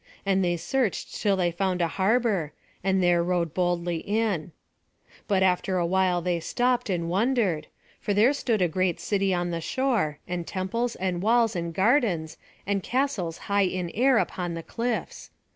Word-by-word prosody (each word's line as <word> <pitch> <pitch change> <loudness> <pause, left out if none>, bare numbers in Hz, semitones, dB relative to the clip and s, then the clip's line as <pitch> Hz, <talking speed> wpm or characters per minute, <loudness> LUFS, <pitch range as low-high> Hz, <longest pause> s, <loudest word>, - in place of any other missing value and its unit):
And 195 -1 +2
they 175 -1 +1
searched 250 +3 -1
till 205 -2 +3
they 175 -2 +1
found 185 +1 -1
a 170 - +2
harbour, 195 - +1 0.3
and 190 -1 +2
there 175 -1 +4
rowed 170 -2 0
boldly 175 -1 0
in. 200 -3 -1 0.8
But 195 -3 +2
after 185 0 +1
awhile 180 0 +1
they 175 -1 0
stopped, 245 +6 0
and 170 -3 -1
wondered; 200 -3 +1 0.3
for - - -3
there 215 +7 +4
stood 230 -8 0
a - - +3
great 180 +1 0
city 195 -2 0
on 175 -1 0
the 165 -1 -3
shore, 225 - 0
and 175 -1 -4
temples 230 +6 -2
and 180 -2 -2
walls 225 +1 +3
and 170 -1 -2
gardens, 190 - +1 0.3
and 200 0 0
castles 235 - -1
high 200 -1 +2
in 180 -2 -3
air 255 +3 +3
upon 175 -5 -1
the 165 - -6
cliffs. 235 +4 -4
190 Hz, 165 wpm, -26 LUFS, 175-220 Hz, 0.8 s, there